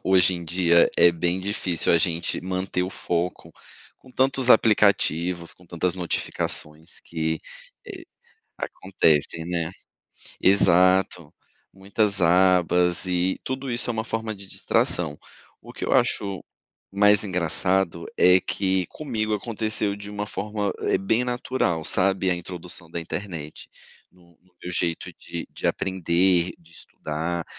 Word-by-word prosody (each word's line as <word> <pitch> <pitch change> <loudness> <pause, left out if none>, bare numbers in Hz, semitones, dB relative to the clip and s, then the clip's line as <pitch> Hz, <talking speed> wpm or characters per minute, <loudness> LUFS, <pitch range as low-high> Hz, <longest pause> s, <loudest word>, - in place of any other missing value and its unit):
hoje 95 -1 +4
em 85 -1 -6
dia, 85 0 +3
é 85 - +7
bem 85 +2 -1
difícil 95 -3 -1
a 85 - +5
gente 85 -1 -1
manter 95 0 -2
o 90 - -3
foco 90 0 -3 0.4
com 130 - -19
tantos 130 0 +1
aplicativos, 90 -6 +3
com 90 - -21
tantas 85 +1 -1
notificações 80 -2 -4
que 80 -1 -2 0.5
eh, - - -9 0.5
acontecem, 80 -4 0
né. 85 -1 -2 0.7
Exato, 90 -3 +4 0.4
muitas 100 +1 0
abas 90 0 +4
e 90 +1 0
tudo 130 0 -4
isso 120 +1 0
é - - 0
uma 110 0 -3
forma 110 -1 -3
de 100 -1 -12
distração. 80 -5 -1 0.4
O - - -12
que - - -6
eu - - -2
acho 100 -2 +1 0.5
mais 105 +1 +4
engraçado 90 -1 0
é 90 +1 +6
que 95 -1 -1
comigo 110 -8 -3
aconteceu 110 -2 -2
de 100 0 -9
uma, 105 0 -4
eh, - - -3
forma 105 -1 -3 0.3
bem 110 +5 +1
natural, 125 -8 -1
sabe, 95 0 +2
a 90 - +2
introdução 85 -1 -8
da 85 - -5
internet, 80 -3 -7 0.4
no 85 -2 -24
no 90 0 -32
meu 90 - -5
jeito 85 -1 -2
de - - -6
de - - -4
aprender, 90 -1 +1
de 85 0 -22
estudar, 80 +1 -5
90 Hz, 135 wpm, -24 LUFS, 85-100 Hz, 0.7 s, é